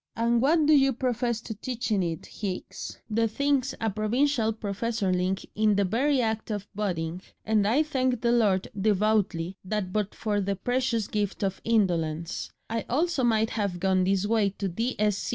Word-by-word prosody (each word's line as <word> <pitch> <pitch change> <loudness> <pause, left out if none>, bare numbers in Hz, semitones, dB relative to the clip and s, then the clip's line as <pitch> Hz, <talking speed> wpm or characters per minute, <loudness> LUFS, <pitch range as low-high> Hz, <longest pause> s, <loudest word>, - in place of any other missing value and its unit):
And 235 0 +2
what 305 +4 +4
do 310 - +5
you 270 -1 +4
profess 240 -2 -1
to 225 - -6
teach 240 +2 -4
in 205 -3 +3
it, 165 -3 -3
Hicks?' 195 -4 -6
"The 225 +1 +1
thing's 275 +3 0
a 225 -1 0
Provincial 225 +3 +1
professorling 200 -3 -1
in 215 -1 +3
the 200 - +3
very 260 +8 +2
act 220 -2 -1
of 205 -2 -3
budding, 180 -4 -2 0.2
and 215 -2 +2
I 265 +8 +3
thank 260 -5 0
the 235 - +2
Lord 205 -6 +2
devoutly 200 -3 +1
that 190 -1 -3
but 210 -2 -1
for 205 -2 -1
the 200 +1 -1
precious 245 +1 0
gift 205 -1 -2
of 195 -1 -2
indolence 170 -7 0 0.2
I 230 0 -2
also 305 +1 +1
might 225 -2 +2
have 200 -5 -2
gone 190 0 +2
this 195 +1 +1
way 215 -2 +2
to 195 0 -4
D.Sc. 210 +1 -1
215 Hz, 170 wpm, -27 LUFS, 195-240 Hz, 0.2 s, do